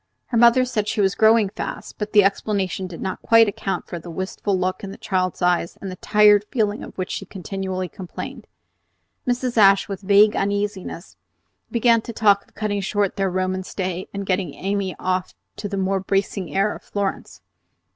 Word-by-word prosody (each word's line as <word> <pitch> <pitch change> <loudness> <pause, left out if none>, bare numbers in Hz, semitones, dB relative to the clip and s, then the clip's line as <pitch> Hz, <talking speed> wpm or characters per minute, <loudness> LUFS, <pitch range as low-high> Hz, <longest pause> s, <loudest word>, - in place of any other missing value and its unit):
Her 235 - 0
mother 240 +2 +6
said 220 -5 -2
she - - -2
was 195 -1 +3
growing 220 -2 +4
fast, - - -7
but 210 0 -3
the 205 -1 +6
explanation 195 -1 -1
did 175 -2 -9
not 190 -1 -4
quite 230 -1 +6
account 195 -1 -3
for 175 - -6
the 170 - -10
wistful 190 +3 -2
look 185 +2 -2
in 200 - -5
the 195 - -9
child's 185 -1 -1
eyes 175 -1 +1
and 195 - -6
the - - -6
tired 210 +1 +5
feeling 215 -5 0
of - - -11
which 185 -1 -3
she - - -3
continually 190 0 -4
complained. 180 +1 -8 0.8
Mrs. 245 0 -1
Ashe, 195 -2 +6
with 195 -1 -5
vague 205 +2 +5
uneasiness, 200 -2 -3 0.5
began 235 -1 +3
to 235 - -8
talk 205 -2 +3
of - - -30
cutting 205 -1 -1
short 200 0 0
their 195 -1 0
Roman 185 +1 -1
stay 185 -1 -4
and 200 0 -5
getting 185 -4 -1
Amy 195 -1 -2
off 185 0 -2 0.2
to 205 - -4
the 200 - -3
more 195 0 0
bracing 195 -1 -1
air 200 +2 +2
of - - -10
Florence. 200 -1 -4
195 Hz, 185 wpm, -22 LUFS, 185-210 Hz, 0.8 s, mother